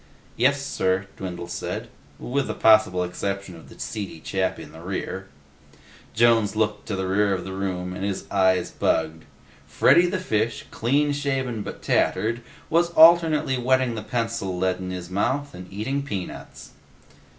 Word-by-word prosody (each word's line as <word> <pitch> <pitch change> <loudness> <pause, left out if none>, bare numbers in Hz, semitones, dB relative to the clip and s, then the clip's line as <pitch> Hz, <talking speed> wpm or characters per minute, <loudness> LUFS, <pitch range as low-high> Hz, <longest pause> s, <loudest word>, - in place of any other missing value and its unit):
"Yes, 140 +1 +3
sir," 95 -6 0
Dwindle 90 -2 -6
said, - - -4 0.3
"with 135 +2 -2
the - - -3
possible 110 -5 +4
exception 95 +1 -4
of 80 - -14
the - - -15
seedy 100 -6 -5
chap 95 +3 -1
in - - -10
the 80 +1 -12
rear." 95 +1 -4 0.9
Jones 115 -2 +4
looked 105 -1 -1
to 100 - -2
the 95 0 -2
rear 100 +1 +2
of 90 - -5
the 95 - -6
room, 90 -2 -3
and 95 - -6
his 100 -1 -3
eyes 95 -2 +2
bugged. 80 0 -1 0.4
Freddy 175 +1 +5
the 185 +2 -1
Fish, 115 - -1
clean 145 +5 +1
shaven 135 -5 -2
but - - -8
tattered, 110 +5 +1 0.3
was 170 +1 +2
alternately 160 -5 +6
wetting 130 0 +2
the 110 - -4
pencil 115 -4 -2
lead 95 0 0
in 90 0 -5
his 90 -1 -6
mouth 140 +9 -1
and 90 0 -10
eating 115 +8 -2
peanuts. 100 -10 -7
105 Hz, 160 wpm, -24 LUFS, 95-130 Hz, 0.9 s, alternately